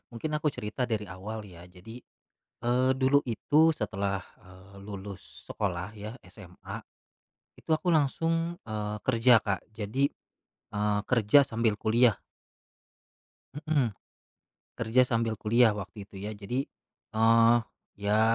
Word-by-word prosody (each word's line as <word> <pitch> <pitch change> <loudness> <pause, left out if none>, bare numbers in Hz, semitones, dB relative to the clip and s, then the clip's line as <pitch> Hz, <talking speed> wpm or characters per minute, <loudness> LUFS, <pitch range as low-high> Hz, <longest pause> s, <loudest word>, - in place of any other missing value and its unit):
mungkin 120 +7 -4
aku 150 -1 0
cerita 105 +4 -3
dari 110 -4 -2
awal 100 +4 -6
ya, 85 -2 -13
jadi, 90 +6 -12 0.7
eee, 125 +2 +2
dulu 130 +2 +4
itu 150 +8 +3
setelah, 100 -5 -2 0.2
eee, 95 +1 -16
lulus 100 -1 -9
sekolah 90 -1 -2
ya 105 +2 -7
SMA 90 -4 -10 0.8
itu - - -21
aku 165 +2 +2
langsung, 165 +3 +1
eee, 105 -1 -3
kerja 120 -1 +5
Kak. 100 -2 -1 0.2
Jadi, 115 +7 0 0.6
eee, 105 0 0
kerja 120 +3 +5
sambil 115 -4 +1
kuliah. 110 +3 +3 1.5
Mhm. 145 -7 +2 0.9
Kerja 115 +3 +3
sambil 115 -1 +1
kuliah 115 +1 +3
waktu 100 0 -7
itu 95 -1 -11
ya, 105 +2 -4
jadi, 120 +7 -3 0.5
eee, 115 +1 +6 0.4
ya 105 +2 +2
110 Hz, 120 wpm, -29 LUFS, 100-125 Hz, 1.5 s, eee